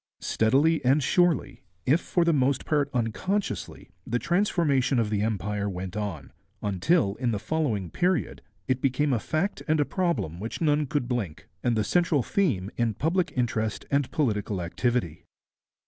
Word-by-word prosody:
Steadily 140 Hz, +8 st, +2 dB
and 135 Hz, +3 st, +3 dB
surely, 175 Hz, -3 st, +2 dB, 0.2 s
if 150 Hz, +7 st, +3 dB
for 175 Hz, -2 st, +1 dB
the 170 Hz, -, +3 dB
most 135 Hz, -2 st, +1 dB
part 145 Hz, -2 st, +1 dB
unconsciously, 125 Hz, -, -2 dB
the 120 Hz, -, -1 dB
transformation 155 Hz, -, +1 dB
of 110 Hz, -3 st, +1 dB
the 105 Hz, -1 st, +1 dB
Empire 105 Hz, -1 st, -1 dB
went 90 Hz, 0 st, -5 dB
on, 100 Hz, -10 st, -4 dB, 0.3 s
until 100 Hz, -, +2 dB
in 125 Hz, 0 st, 0 dB
the 110 Hz, -, 0 dB
following 110 Hz, -, -1 dB
period 180 Hz, 0 st, 0 dB, 0.3 s
it 130 Hz, 0 st, 0 dB
became 135 Hz, +1 st, +1 dB
a 120 Hz, -, +1 dB
fact 155 Hz, -, -2 dB
and 155 Hz, -1 st, +2 dB
a 145 Hz, -, +3 dB
problem 135 Hz, -, -1 dB
which 110 Hz, +3 st, -5 dB
none 150 Hz, -2 st, +2 dB
could 145 Hz, -3 st, -1 dB
blink, 110 Hz, -7 st, -3 dB, 0.2 s
and 120 Hz, -2 st, +1 dB
the 110 Hz, -, +2 dB
central 165 Hz, -2 st, +2 dB
theme 110 Hz, -, 0 dB
in 115 Hz, -3 st, 0 dB
public 170 Hz, -, 0 dB
interest 115 Hz, -4 st, -1 dB
and 140 Hz, -2 st, +1 dB
political 105 Hz, -8 st, -1 dB
activity. 90 Hz, -1 st, -2 dB
125 Hz, 160 wpm, -27 LUFS, 105-155 Hz, 0.3 s, and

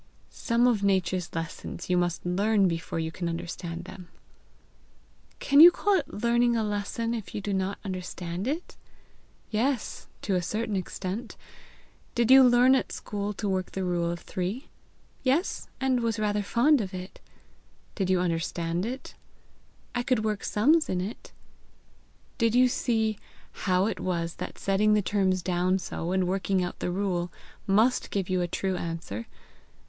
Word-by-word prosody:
"Some 235 Hz, 0 st, +1 dB
of 235 Hz, -5 st, +3 dB
Nature's 185 Hz, -3 st, 0 dB
lessons 165 Hz, +1 st, -5 dB
you 180 Hz, -, +2 dB
must 175 Hz, -1 st, 0 dB
learn 200 Hz, +3 st, +3 dB
before 165 Hz, -1 st, -3 dB
you 160 Hz, 0 st, -2 dB
can 170 Hz, +1 st, -3 dB
understand 170 Hz, 0 st, -5 dB
them." 180 Hz, -1 st, -10 dB, 1.3 s
"Can 280 Hz, +1 st, +3 dB
you 335 Hz, +3 st, +12 dB
call 405 Hz, +3 st, +1 dB
it 370 Hz, -6 st, 0 dB
learning 235 Hz, +2 st, +2 dB
a 225 Hz, -, +1 dB
lesson 210 Hz, +3 st, -2 dB
if 225 Hz, -4 st, -6 dB
you -, -, -1 dB
do 205 Hz, 0 st, -3 dB
not 190 Hz, +1 st, -1 dB
understand 180 Hz, 0 st, -4 dB
it?" 315 Hz, +6 st, -3 dB, 0.8 s
"Yes 240 Hz, +3 st, -1 dB, 0.2 s
to 200 Hz, -, 0 dB
a 180 Hz, -, +2 dB
certain 215 Hz, +4 st, -2 dB
extent. 190 Hz, +3 st, -4 dB, 0.8 s
Did 235 Hz, +1 st, +3 dB
you 265 Hz, 0 st, +10 dB
learn 250 Hz, +1 st, +6 dB
at 265 Hz, -, +1 dB
school 205 Hz, 0 st, -4 dB
to 205 Hz, +1 st, -4 dB
work 185 Hz, -1 st, -2 dB
the 190 Hz, -, -2 dB
rule 175 Hz, -2 st, 0 dB
of 170 Hz, 0 st, -4 dB
three?" 190 Hz, -, -4 dB, 0.5 s
"Yes; 280 Hz, +8 st, 0 dB
and 265 Hz, -2 st, +2 dB
I -, -, -3 dB
was 230 Hz, -1 st, 0 dB
rather 210 Hz, -1 st, 0 dB
fond 240 Hz, +7 st, +3 dB
of 190 Hz, -2 st, -5 dB
it." 185 Hz, +1 st, -8 dB, 0.7 s
"Did 190 Hz, -2 st, -2 dB
you 185 Hz, -1 st, +3 dB
understand 170 Hz, +1 st, -1 dB
it?" 260 Hz, +3 st, -6 dB, 0.8 s
"I 245 Hz, -, 0 dB
could 245 Hz, -3 st, 0 dB
work 210 Hz, -2 st, -1 dB
sums 305 Hz, +10 st, +3 dB
in 185 Hz, -, 0 dB
it." 195 Hz, +5 st, -6 dB, 1.1 s
"Did 230 Hz, -1 st, +2 dB
you 255 Hz, +1 st, +6 dB
see 220 Hz, -4 st, 0 dB, 0.3 s
how 185 Hz, 0 st, +1 dB
it 220 Hz, -, -2 dB
was 170 Hz, -2 st, -2 dB
that -, -, -6 dB
setting 210 Hz, +2 st, +2 dB
the 210 Hz, -, +2 dB
terms 185 Hz, -3 st, +1 dB
down 180 Hz, +1 st, +1 dB
so, 175 Hz, -2 st, -4 dB
and 185 Hz, -1 st, +1 dB
working 190 Hz, 0 st, 0 dB
out 180 Hz, -, -5 dB
the -, -, -2 dB
rule, 180 Hz, -2 st, -1 dB, 0.4 s
must 220 Hz, +6 st, +3 dB
give 195 Hz, -2 st, -2 dB
you 185 Hz, -1 st, +2 dB
a 175 Hz, -, 0 dB
true 190 Hz, +2 st, -2 dB
answer. 165 Hz, -, -5 dB
195 Hz, 165 wpm, -27 LUFS, 180-230 Hz, 1.3 s, you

